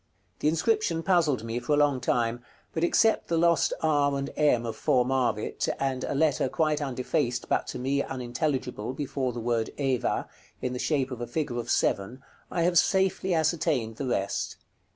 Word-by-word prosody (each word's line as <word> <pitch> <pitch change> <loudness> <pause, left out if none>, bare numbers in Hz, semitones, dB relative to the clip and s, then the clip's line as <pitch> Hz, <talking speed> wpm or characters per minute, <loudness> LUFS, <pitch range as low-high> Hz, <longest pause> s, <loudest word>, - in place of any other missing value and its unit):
The - - +1
inscription 165 +1 +1
puzzled 160 - +2
me 115 +1 -3
for 125 +5 -1
a - - +3
long 145 -3 +3
time; 120 -1 0 0.3
but 160 - -1
except 220 +5 +3
the 165 - 0
lost 170 0 +3
r 145 -3 +2
and 140 0 -3
m 135 -6 +3
of 115 - -4
"formavit," 125 -4 +1
and 135 -2 -1
a - - -2
letter 145 -3 +2
quite 155 0 +1
undefaced, 125 -2 -1
but - - 0
to - - -5
me 135 +2 0
unintelligible, 125 -2 -3
before 135 -2 -2
the 120 - -6
word 115 -1 0
Eva, 135 -4 0 0.3
in 125 - -3
the 125 - -4
shape 135 -3 0
of 125 -2 -6
a 120 - -3
figure 120 -1 -2
of 120 - -5
7, 100 +7 0 0.3
I 170 - 0
have 175 0 +5
safely 190 -1 +1
ascertained 155 -8 0
the 140 - -3
rest. 100 -5 -2
135 Hz, 175 wpm, -27 LUFS, 120-160 Hz, 0.3 s, have